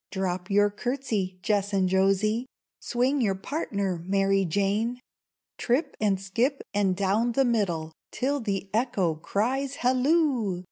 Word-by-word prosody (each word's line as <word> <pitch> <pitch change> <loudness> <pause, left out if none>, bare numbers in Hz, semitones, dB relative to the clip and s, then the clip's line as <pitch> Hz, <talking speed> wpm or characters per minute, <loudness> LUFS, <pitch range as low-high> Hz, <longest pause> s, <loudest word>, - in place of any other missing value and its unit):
Drop 185 -1 -3
your 205 +1 +3
courtesy, 215 -5 -2
Jess 205 0 0
and 190 -1 +2
Josie; 195 +5 +2 0.3
Swing 255 +3 0
your 200 -5 +1
partner, 195 - -3
Mary 195 +1 +2
Jane! 205 +7 0 0.6
Trip 250 +7 0
and 200 -3 +2
skip, 235 +9 -1
and 200 -2 +2
down 205 +5 +1
the 270 +2 +3
middle, 180 -9 0 0.2
Till 280 +3 -1
the 200 -4 -3
Echo 215 -7 +1
cries, 255 - -1
"Halloo! 255 - +2
205 Hz, 130 wpm, -27 LUFS, 195-245 Hz, 0.6 s, your